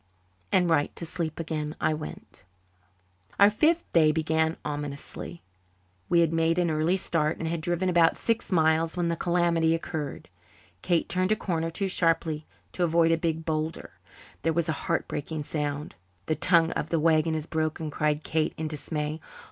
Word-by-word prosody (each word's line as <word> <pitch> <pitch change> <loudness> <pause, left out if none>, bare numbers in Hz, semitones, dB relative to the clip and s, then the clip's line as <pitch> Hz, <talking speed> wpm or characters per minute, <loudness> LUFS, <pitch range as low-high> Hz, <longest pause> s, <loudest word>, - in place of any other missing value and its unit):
And 180 -1 +4
right 155 -3 +2
to 170 - -5
sleep 165 -2 -4
again 155 -2 -3
I 155 - +2
went. 155 0 -8 1.0
Our 200 +1 +7
fifth 320 +10 +1
day 155 -2 +5
began 160 +1 0
ominously. 145 +3 -6 0.7
We 170 -1 +5
had 165 -1 +2
made 165 +1 +2
an 175 -2 +2
early 155 +4 +2
start 155 -4 0
and 165 - -3
had 165 0 -2
driven 175 +3 0
about 170 -2 +4
six 230 -2 -1
miles 160 0 +2
when 175 -1 +1
the 170 - 0
calamity 170 -1 +2
occurred. 155 -4 -5 0.5
Kate 170 -2 +1
turned 185 +2 0
a - - +5
corner 165 -6 -2
too 195 +4 -2
sharply, 165 -4 0 0.3
to 180 - -1
avoid 165 -1 +3
a - - +5
big 160 -1 -2
boulder; 160 0 -3 0.5
there 165 - +1
was 170 0 0
a - - +1 0.2
heart - - +1
breaking 150 +1 -4
sound. 145 -1 -3 0.3
"The 155 - +1
tongue 165 0 +3
of 150 - -3
the 165 - +1
wagon 160 0 +3
is 155 -1 -3
broken," 155 -1 -2
cried 150 +1 0
Kate 160 -1 0
in 160 - -2
dismay. 150 +1 -4
160 Hz, 170 wpm, -27 LUFS, 155-170 Hz, 1.0 s, Our